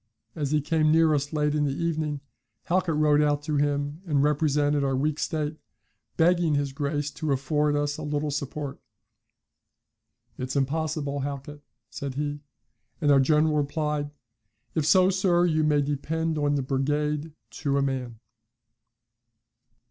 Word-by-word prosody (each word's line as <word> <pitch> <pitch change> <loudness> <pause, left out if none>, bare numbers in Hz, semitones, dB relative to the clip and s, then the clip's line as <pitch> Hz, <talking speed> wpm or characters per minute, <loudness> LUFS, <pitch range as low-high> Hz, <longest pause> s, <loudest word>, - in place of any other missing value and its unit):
As 145 -3 -2
he 150 +1 +2
came 155 +1 +2
near 160 -1 +4
us 145 0 -1
late 150 -1 +1
in 150 -1 +1
the 140 - 0
evening, 155 -3 -2 0.4
Halkett 175 -2 0
rode 150 -1 +4
out 145 -1 +1
to 150 -1 -1
him 145 +2 -1
and 145 -3 +2
represented 145 -1 +2
our 135 -1 +1
weak 150 +3 0
state, 155 -1 -2 0.6
begging 170 -2 +3
his 140 -1 -1
Grace 145 +1 -2
to 155 +1 -3
afford 145 +2 +1
us 145 +1 -1
a - - -5
little 150 0 -2
support. 140 0 -4 1.6
'It's 130 +2 -4
impossible, 145 0 -1
Halkett,' 140 +1 -5 0.3
said 140 -2 -5
he. 145 0 -2 0.6
And 145 -4 +3
our 140 - +6
general 155 +3 +3
replied, 150 0 -1 0.6
'If 155 -2 0
so, 185 +1 +5
sir, 180 -2 +2
you 155 -2 +2
may 150 -1 +3
depend 160 +3 -2
on 145 -1 +1
the 140 - 0
brigade 150 +3 -1 0.3
to 140 -3 0
a 140 - +2
man!'" 125 -4 -3
150 Hz, 150 wpm, -26 LUFS, 140-155 Hz, 1.6 s, our